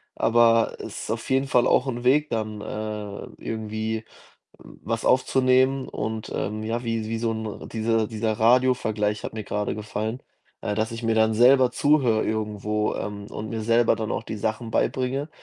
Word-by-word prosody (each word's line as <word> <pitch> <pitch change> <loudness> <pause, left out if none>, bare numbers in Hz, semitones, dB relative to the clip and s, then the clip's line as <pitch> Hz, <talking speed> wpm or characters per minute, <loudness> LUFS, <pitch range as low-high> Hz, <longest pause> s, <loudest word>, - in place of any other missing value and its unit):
Aber 115 0 +4
es - - -7
ist - - -4
auf 115 0 -4
jeden 135 +1 +2
Fall 125 -2 +3
auch 125 - +3
'n 120 -2 -3
Weg, 150 +4 +3
dann, 110 -2 -3
äh, 105 -1 -5
irgendwie 110 0 -3 0.6
w - - -15
was 115 0 -2
aufzunehmen 130 +1 +3
und, 110 0 -4
ähm, 105 +2 -3
ja, 115 +2 -3
wie 115 -1 -2
wie 115 0 -2
so 115 0 0
'n 110 -1 -6
diese 115 -1 +1
dieser 110 0 -1
Radiovergleich 110 -3 +2
hat - - -4
mir 110 - -5
gerade 105 +1 -2
gefallen 110 +2 -4 0.4
äh, 105 - -1
dass 110 +2 -1
ich 115 +1 -6
mir 115 0 +1
dann 110 0 +3
selber 125 +2 +6
zuhöre 135 -7 +2
irgendwo, 105 -1 -1
ähm, 100 -1 -5
und 110 0 -6
mir 115 -1 -3
selber 115 +1 +3
dann 110 0 -4
auch - - -2
die 110 -1 -6
Sachen 110 +2 -2
beibringe. 130 +5 0
110 Hz, 180 wpm, -25 LUFS, 110-120 Hz, 0.6 s, selber